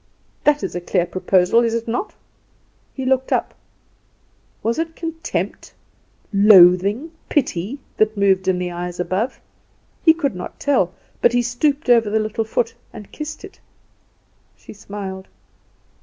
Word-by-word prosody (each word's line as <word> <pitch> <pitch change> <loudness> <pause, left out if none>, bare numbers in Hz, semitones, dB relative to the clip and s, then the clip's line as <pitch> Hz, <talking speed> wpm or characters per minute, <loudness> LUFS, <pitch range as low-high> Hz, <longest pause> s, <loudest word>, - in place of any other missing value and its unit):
That 295 0 +3
is - - -3
a 175 - -4
clear 175 0 0
proposal, 185 +3 +2
is 230 -1 0
it 230 0 -3
not?" 245 - -3 0.8
He 265 - -6
looked 265 0 +1
up. - - 0 1.1
Was 230 +6 0
it 325 0 -3
contempt, 330 0 -4 0.6
loathing, 200 - +6 0.2
pity, 245 - -1 0.2
that 215 0 +2
moved 190 -1 +2
in 185 -1 +2
the 180 0 -3
eyes 175 0 -6
above! 190 +8 -2 0.6
He 320 -1 +6
could 290 -7 -1
not 180 - -8
tell; 255 -11 +1 0.3
but - - +4
he 245 0 +2
stooped 275 +5 0
over 230 -3 +4
the 215 - +1
little 215 +1 -1
foot 460 - -1 0.2
and 210 -3 -11
kissed 310 +5 -7
it. 390 - -15 1.0
She - - -13
smiled. 195 -2 -7
220 Hz, 140 wpm, -20 LUFS, 190-280 Hz, 1.1 s, loathing